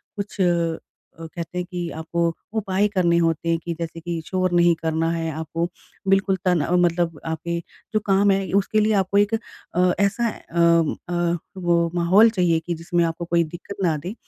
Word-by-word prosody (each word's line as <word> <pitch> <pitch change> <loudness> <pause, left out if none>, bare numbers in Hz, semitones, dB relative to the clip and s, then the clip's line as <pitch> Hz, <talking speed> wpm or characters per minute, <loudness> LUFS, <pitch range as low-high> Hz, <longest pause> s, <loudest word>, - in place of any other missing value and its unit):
कुछ 200 -1 -4
अ, 170 -1 -2
कहते 170 +2 -7
हैं 180 - -1
कि 175 -2 -3
आपको 165 +1 -1 0.2
उपाय 200 -1 +1
करने 180 -4 +2
होते 165 -1 +1
हैं 165 - +3
कि 170 - -3
जैसे 165 0 -5
कि 170 0 -4
शोर 185 0 0
नहीं 175 0 +5
करना 160 0 -1
है 165 -1 -2
आपको 160 +2 -3 0.4
बिल्कुल 195 0 +3
तन 180 -3 +3 0.2
मतलब 170 -2 0
आपके 170 +1 -3 0.3
जो 215 - +3
काम 200 0 +4
हैं 195 0 0
उसके 200 +2 +2
लिए 215 +1 +2
आपको 195 0 +1
एक 205 +2 +3 0.4
अ, 180 0 +3
ऐसा 205 +4 +2
अ 170 -6 +1
अ, 175 0 0 0.2
वो 170 -2 +2
माहौल 185 +6 +5
चाहिए 180 -6 +2
कि 175 +2 -4
जिसमें 170 +1 0
आपको 165 +1 -3
कोई 170 0 +2
दिक्कत 175 +5 -8
ना 165 -3 +2
दे, 175 +7 -6
175 Hz, 180 wpm, -23 LUFS, 165-190 Hz, 0.4 s, नहीं